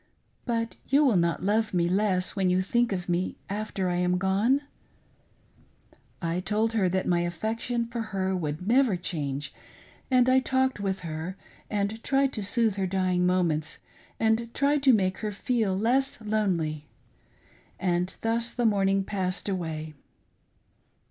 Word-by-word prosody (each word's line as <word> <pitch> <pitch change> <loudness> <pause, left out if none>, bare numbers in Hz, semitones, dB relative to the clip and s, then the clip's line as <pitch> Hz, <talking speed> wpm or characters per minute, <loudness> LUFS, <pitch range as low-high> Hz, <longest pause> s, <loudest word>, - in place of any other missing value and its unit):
But 230 -2 -2
you 285 +2 +4
will 250 -6 +4
not 170 0 +1
love 215 +1 +1
me 170 -1 +2
less 185 0 +1
when 190 -2 +1
you 185 +1 +2
think 235 +4 +1
of 180 -2 -3
me 175 +1 -1
after 205 -2 -2
I 175 -1 0
am 180 0 +1
gone 200 +9 +2 0.5
} - - -37 0.2
" - - -33
I 175 - -1
told 215 +4 0
her 200 -5 +2
that 185 +1 0
my 175 -1 +2
affection 220 +8 -2
for 235 0 -4
her 190 -3 -2
would 160 +1 -3
never 240 -4 +4
change, 145 -5 -4 0.6
and 255 -1 +4
I 260 0 +5
talked 260 -2 0
with 195 -1 -2
her, 165 +3 -5 0.3
and 210 +2 -2
tried 270 0 +2
to 215 - -2
soothe 220 0 +2
her 190 -1 0
dying 185 -1 +1
moments, 165 -4 0 0.4
and 225 +1 +1
to 280 -1 +3
make 190 -5 +2
her 215 -1 -3
feel 210 -2 0
less 255 +6 +1
lonely; 180 -9 -1 0.9
and 180 0 0
thus 230 +1 +1
the 240 -1 -2
morning 195 -2 +2
passed 190 -1 -2
away. 160 -5 -3
195 Hz, 155 wpm, -27 LUFS, 180-230 Hz, 0.9 s, I